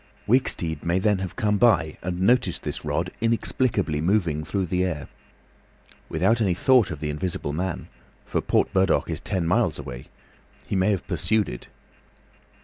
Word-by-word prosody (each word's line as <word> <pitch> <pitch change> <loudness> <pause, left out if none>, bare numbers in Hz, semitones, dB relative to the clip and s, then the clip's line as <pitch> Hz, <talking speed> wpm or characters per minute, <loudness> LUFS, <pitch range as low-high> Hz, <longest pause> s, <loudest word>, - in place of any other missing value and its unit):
Wicksteed 85 - +1
may 85 +1 +1
then 100 0 +2
have 95 -1 -5
come 105 -1 +1
by 80 -10 +3
and 90 +1 -3
noticed 115 -3 +2
this - - -4
rod - - -2
inexplicably 110 - 0
moving 85 -4 +1
through 95 +3 -1
the 90 +1 0
air. 85 -6 -3 1.0
Without 95 +9 +2
any 95 -5 +2
thought 125 +1 +4
of 80 -3 -6
the 75 -1 -2
Invisible 75 -2 -3
Man—for 90 +2 -5
Port - - +1
Burdock 95 -2 +2
is - - -2
ten 90 -3 -2
miles 95 -2 +1
away—he 65 +7 -10
may 95 +2 +2
have 100 -4 0
pursued 95 +5 +1
it. - - -8
95 Hz, 150 wpm, -24 LUFS, 80-105 Hz, 1.0 s, thought